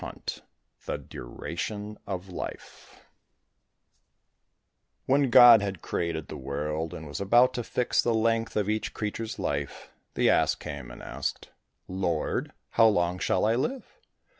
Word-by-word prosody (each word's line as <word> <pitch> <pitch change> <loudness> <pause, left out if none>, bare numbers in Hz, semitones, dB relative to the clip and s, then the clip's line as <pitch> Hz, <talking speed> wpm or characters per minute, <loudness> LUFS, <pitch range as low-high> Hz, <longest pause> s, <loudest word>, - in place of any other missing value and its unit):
176 - - -6 0.4
The - - -1
Duration 105 - -6
of 95 -1 -4
Life 90 - -8 2.0
When 140 0 +3
God 120 -2 +9
had 100 -4 -4
created 80 -2 -2
the - - -7
world 75 +4 -3
and 80 - -8
was 75 +7 -6
about 120 +6 +5
to 120 - -3
fix 125 +2 +1
the 120 -1 +1
length 115 0 +1
of 105 -2 +1
each 110 0 -2
creature's 110 +1 -4
life, 70 0 -4 0.2
the - - +3
ass - - +4
came 70 -5 -7
and - - -11
asked, - - -4 0.4
"Lord, 90 -4 -1 0.2
how 115 -1 +6
long 90 -3 +1
shall 90 - +1
I 110 - +3
live?" 240 - -1
100 Hz, 140 wpm, -28 LUFS, 80-115 Hz, 2.0 s, God